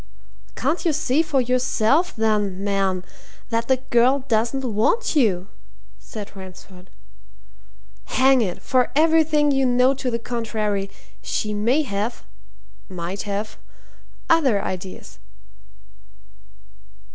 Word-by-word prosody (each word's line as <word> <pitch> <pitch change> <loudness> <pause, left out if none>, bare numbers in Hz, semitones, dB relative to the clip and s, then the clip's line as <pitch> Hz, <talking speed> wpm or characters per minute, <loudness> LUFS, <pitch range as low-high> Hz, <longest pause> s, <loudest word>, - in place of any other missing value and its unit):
"Can't 295 +7 -1
you 330 - +1
see 285 0 +1
for 310 -4 0
yourself, 255 +5 +1
then, 210 -4 0
man, 195 -2 0 0.5
that 230 0 0
the 260 - +3
girl 255 +1 +2
doesn't 235 +3 0
want 250 - +1
you!" 200 -10 +2 0.5
said 195 - -9
Ransford. 185 -1 -12 1.2
"Hang 260 - +3
it! 190 -5 -3
for 255 -2 +1
anything 310 -1 +3
you 270 -1 +2
know 250 +2 +4
to 265 -1 -3
the 230 - -1
contrary, 215 -4 -2 0.3
she 110 - -2
may 235 +9 +2
have 210 -1 -3 0.7
might 185 +3 -5
have 210 +2 -4 0.7
other 280 -11 +3
ideas!" 185 - -7
230 Hz, 110 wpm, -22 LUFS, 200-270 Hz, 1.2 s, know